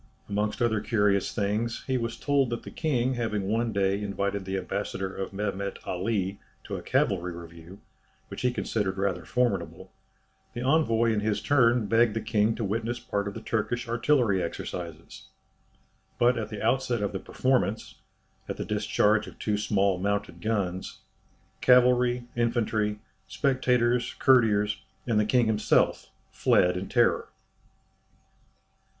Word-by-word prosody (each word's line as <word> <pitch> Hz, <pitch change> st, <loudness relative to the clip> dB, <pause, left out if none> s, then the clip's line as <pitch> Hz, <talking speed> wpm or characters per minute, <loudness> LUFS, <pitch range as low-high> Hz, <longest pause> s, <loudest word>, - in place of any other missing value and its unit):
Amongst 105 Hz, +2 st, -1 dB
other 110 Hz, -3 st, +1 dB
curious 105 Hz, -4 st, +1 dB
things, 110 Hz, +2 st, -1 dB
he 130 Hz, -, -1 dB
was 115 Hz, -2 st, -2 dB
told 140 Hz, -3 st, +1 dB
that 120 Hz, -, -4 dB
the -, -, -9 dB
king 130 Hz, -5 st, 0 dB
having 110 Hz, -4 st, -2 dB
one 115 Hz, +4 st, 0 dB
day 100 Hz, 0 st, +1 dB
invited 100 Hz, -1 st, -2 dB
the 95 Hz, 0 st, -2 dB
ambassador 95 Hz, 0 st, -3 dB
of 95 Hz, -, -4 dB
Mehemet 100 Hz, 0 st, -3 dB
Ali 95 Hz, +1 st, -2 dB, 0.2 s
to -, -, -5 dB
a -, -, -5 dB
cavalry 90 Hz, -2 st, 0 dB
review, 85 Hz, +2 st, -11 dB, 0.5 s
which -, -, -7 dB
he 125 Hz, -, +3 dB
considered 105 Hz, -5 st, -2 dB
rather 95 Hz, -2 st, -1 dB
formidable, 125 Hz, -1 st, -1 dB, 0.6 s
the 120 Hz, -, -3 dB
envoy 120 Hz, -6 st, +3 dB
in 105 Hz, -, +1 dB
his 105 Hz, 0 st, 0 dB
turn 120 Hz, -5 st, +3 dB
begged 115 Hz, 0 st, +3 dB
the -, -, 0 dB
king 110 Hz, 0 st, +1 dB
to 115 Hz, -, -4 dB
witness 115 Hz, +4 st, -2 dB
part 100 Hz, -3 st, -2 dB
of 100 Hz, -, -5 dB
the 115 Hz, -, -6 dB
Turkish 120 Hz, +3 st, -2 dB
artillery 120 Hz, -4 st, +2 dB
exercises. 85 Hz, -1 st, -6 dB, 0.9 s
But 125 Hz, +1 st, +4 dB
at 110 Hz, -3 st, -3 dB
the 105 Hz, -2 st, -6 dB
outset 120 Hz, -2 st, +1 dB
of 100 Hz, -, -1 dB
the 95 Hz, -, -4 dB
performance 125 Hz, -3 st, -1 dB, 0.5 s
at -, -, -4 dB
the -, -, -4 dB
discharge 105 Hz, 0 st, +1 dB
of -, -, -12 dB
two 105 Hz, -, -1 dB
small 100 Hz, -3 st, +1 dB
mounted 100 Hz, +1 st, -2 dB
guns 100 Hz, -5 st, -2 dB, 0.6 s
cavalry, 125 Hz, -1 st, +4 dB
infantry, 110 Hz, -3 st, 0 dB, 0.3 s
spectators, 125 Hz, -3 st, +1 dB
courtiers, 105 Hz, -5 st, +3 dB, 0.2 s
and 110 Hz, -3 st, +2 dB
the 105 Hz, -, +2 dB
king 120 Hz, +2 st, +3 dB
himself, 110 Hz, -1 st, +1 dB, 0.2 s
fled 90 Hz, 0 st, +3 dB
in 90 Hz, +2 st, -4 dB
terror. 120 Hz, -1 st, +2 dB
110 Hz, 145 wpm, -27 LUFS, 100-120 Hz, 0.9 s, But